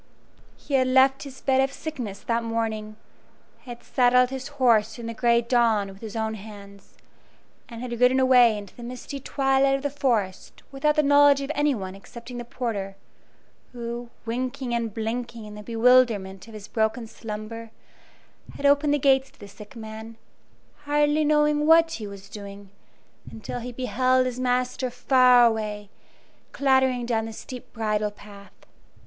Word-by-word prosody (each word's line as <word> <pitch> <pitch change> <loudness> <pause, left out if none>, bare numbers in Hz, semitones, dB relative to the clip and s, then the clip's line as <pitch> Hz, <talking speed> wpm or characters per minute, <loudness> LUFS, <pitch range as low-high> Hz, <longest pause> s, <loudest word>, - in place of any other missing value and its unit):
He 285 - -9
had 260 -1 +3
left 265 +1 +4
his 270 -2 -10
bed 265 -1 +2
of 270 0 0
sickness 250 -13 -6
that 235 0 -1
morning, 220 -2 -3 0.7
had 240 -1 -9
saddled 250 0 +3
his 265 0 -5
horse 225 -4 +3
in 235 - -8
the 230 - -4
gray 235 0 +2
dawn 230 -4 +2
with 195 0 -13
his 220 -1 -8
own 220 -1 -2
hands, 200 -2 -12 0.7
and 230 -1 -8
had 240 -2 -5
ridden 255 +1 +5
away 250 -4 +5
into 200 -2 -10
the - - -12
misty 250 +3 -7
twilight 270 0 +1
of 275 - -5
the 285 - -1
forest 230 -10 -2
without 295 +2 +1
the 305 - +3
knowledge 285 0 +5
of 275 +2 -3
anyone 260 -11 -1
excepting 235 +5 -10
the - - -5
porter, 210 -5 -4 0.8
who, 235 0 -6 0.2
winking 245 +1 -3
and 230 -2 -1
blinking 230 0 -4
in 210 - -10
the 210 - -9
bewilderment 225 -4 +2
of 225 - -12
his 210 -1 -9
broken 220 +2 -1
slumber, 225 +1 -8 0.9
had 285 - -5
opened 285 +1 +4
the - - +1
gates 270 -1 +3
to 275 - -27
the 205 - -10
sick 210 +4 -14
man, 220 0 -9 0.7
hardly 295 +1 +2
knowing 300 0 +2
what 330 0 +6
he 220 -10 -5
was 200 -1 -11
doing, 200 -1 -10 0.6
until 225 +2 -7
he 245 +1 -6
beheld 255 +1 +1
his 250 0 -4
master 255 0 -1
far 250 0 +5
away, 210 -2 -2 0.6
clattering 265 -3 +2
down 225 -2 -1
the 225 - -6
steep 250 +3 -10
bridle 215 -2 -1
path. 205 -1 -16
240 Hz, 160 wpm, -25 LUFS, 220-265 Hz, 0.9 s, what